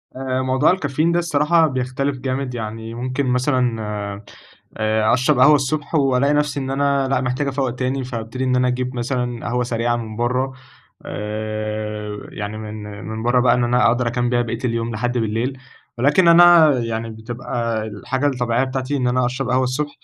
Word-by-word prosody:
آآ، 130 0 -2
موضوع 130 +4 +3
الكافيين 155 -1 0
ده 175 - +2
الصراحة 160 0 +3
بيختلف 130 +1 -2
جامد، 130 0 -3
يعني 110 0 -6
ممكن 130 +3 -2
مثلًا، 125 -2 +1 1.0
آآ 110 0 +2
أشرب 130 +2 +2
قهوة 150 +4 +7
الصبح 145 +3 -1
وألاقي 140 -1 +3
نفسي 145 -1 0
إن 135 -1 -3
أنا 140 0 +1
لأ، 135 - +1
محتاج 130 +3 -1
أفوّق 135 -1 -1
تاني، 130 +2 -2
فابتدي 125 +1 -5
إن 130 -1 +1
أنا 125 0 +2
أجيب 125 +1 -2
مثلًا 120 -1 -2
قهوة 125 +1 0
سريعة 120 0 0
من 110 -2 -6
برّه. 125 +3 -1 0.5
آآ 105 0 -4
يعني 105 +1 -5
من 110 0 -7 0.2
من 110 +1 -5
برّه 120 +1 +3
بقى 125 - +4
إن 125 - +1
أنا 125 +1 +3
أقدر 120 +1 +2
أكمّل 120 0 -1
بيها 120 -1 +2
باقية 115 -1 -4
اليوم 115 -1 -1
لحد 120 +2 -1
بالليل، 115 +4 -1 0.4
ولكن 150 +7 +4
أنا 170 -2 +8
يعني 115 -1 -3
بتبقى 115 0 -3
الحاجة 115 +7 -2
الطبيعية 125 -2 +1
بتاعتي 130 +2 -2
إن 125 -2 0
أنا 125 0 +1
أشرب 130 +1 -3
قهوة 130 +1 +2
الصبح، 140 +4 -2
125 Hz, 175 wpm, -20 LUFS, 115-135 Hz, 1.0 s, أنا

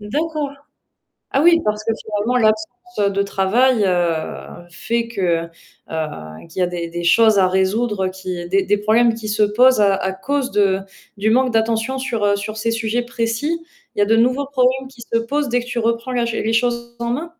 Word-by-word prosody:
D'accord. 300 +7 -2 0.8
Ah 275 - +2
oui, 335 +1 +6
parce 210 0 -1
que 225 - 0
finalement 220 +4 0
l'absence 220 - 0
de 200 - +1
travail, 215 +5 +2
heu, 175 -1 -2
fait 230 +7 -2
que, 175 -7 -1 0.4
heu, 150 - -5
qu'il 185 - -7
y - - +2
a 180 - +1
des 170 -1 -4
des 175 +1 -5
choses 220 +3 +5
à 185 - +4
résoudre, 190 +2 0
qui 185 -2 -5
des 195 +2 +2
des 205 +2 +1
problèmes 225 +3 +3
qui 225 -1 -7
se 210 0 +2
posent 240 +3 +4
à 200 -1 +4
à 190 0 -2
cause 265 +7 -2
de 195 -2 +2 0.4
du 210 +2 +1
manque 255 +1 +3
d'attention 225 +3 0
sur, 240 -5 -2
heu, 200 0 +3
sur 215 +2 -5
ces 230 +1 -1
sujets 230 +1 -1
précis. 240 +7 -2 0.4
Il - - -4
y - - +4
a - - +5
de 225 +2 +3
nouveaux 255 +5 +2
problèmes 265 -1 +1
qui 255 -3 -15
se 230 - +3
posent 275 +4 -1
dès 245 +1 +2
que - - -10
tu 245 -1 -3
reprends 230 +2 -1
la 240 -1 0
ch 230 -1 -2
les 225 - 0
choses 235 0 0
en 235 0 -2
main? 280 +7 -2
225 Hz, 205 wpm, -19 LUFS, 195-245 Hz, 0.8 s, oui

